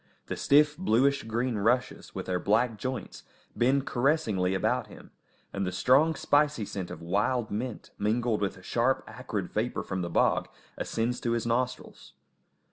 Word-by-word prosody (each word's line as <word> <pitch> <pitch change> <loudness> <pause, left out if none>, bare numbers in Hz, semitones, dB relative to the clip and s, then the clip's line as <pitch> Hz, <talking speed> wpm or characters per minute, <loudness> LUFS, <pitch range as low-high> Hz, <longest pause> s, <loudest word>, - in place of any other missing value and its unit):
The - - -4
stiff, 150 +1 +4
bluish 140 -3 +3
green 115 0 -1
rushes, 120 +5 0
with - - -4
their 90 -1 -1
black 110 +2 +1
joints, 130 -1 -5 0.3
bend 135 +3 +2
caressingly 120 - +1
about 95 - 0
him, - - -14 0.4
and 100 - -2
the 90 - -1
strong, 145 - +4
spicy 145 -8 +2
scent 95 -2 -5
of - - -8
wild 105 +7 0
mint, 115 +2 -4
mingled 110 +1 +1
with 100 -1 -1
the 95 - -15
sharp, 120 +6 +1
acrid 105 -7 -5
vapour 115 +3 -1
from 95 -1 -3
the 85 - -3
bog, - - +2 0.3
ascends 115 +2 -2
to 115 - -1
his 115 -1 -1
nostrils. 125 +2 -3
120 Hz, 160 wpm, -28 LUFS, 100-130 Hz, 0.4 s, stiff